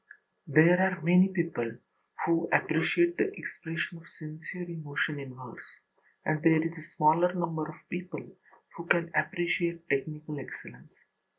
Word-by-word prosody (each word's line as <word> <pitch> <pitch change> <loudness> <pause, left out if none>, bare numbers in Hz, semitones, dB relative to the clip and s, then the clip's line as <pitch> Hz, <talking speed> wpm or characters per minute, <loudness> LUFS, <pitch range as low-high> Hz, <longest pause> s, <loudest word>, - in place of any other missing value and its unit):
There 170 +4 +6
are 190 -2 +2
many 180 +3 +6
people 165 -11 -2 0.5
who 165 0 +1
appreciate 345 - +2
the 405 -1 +1
expression 165 +1 -5
of 165 - -17
sincere 160 +3 -8
emotion 155 -2 -3
in 135 -2 -8
verse, 125 -2 -12 0.5
and 155 -1 0
there 160 -1 +5
is 165 0 -2
a 165 0 -12
smaller 160 +4 +4
number 165 -3 -2
of 155 - -9
people 180 +1 -7 0.4
who 170 0 -8
can 170 -1 +2
appreciate 170 +1 0
technical 150 +2 -2
excellence. 135 - -11
165 Hz, 135 wpm, -29 LUFS, 155-175 Hz, 0.5 s, There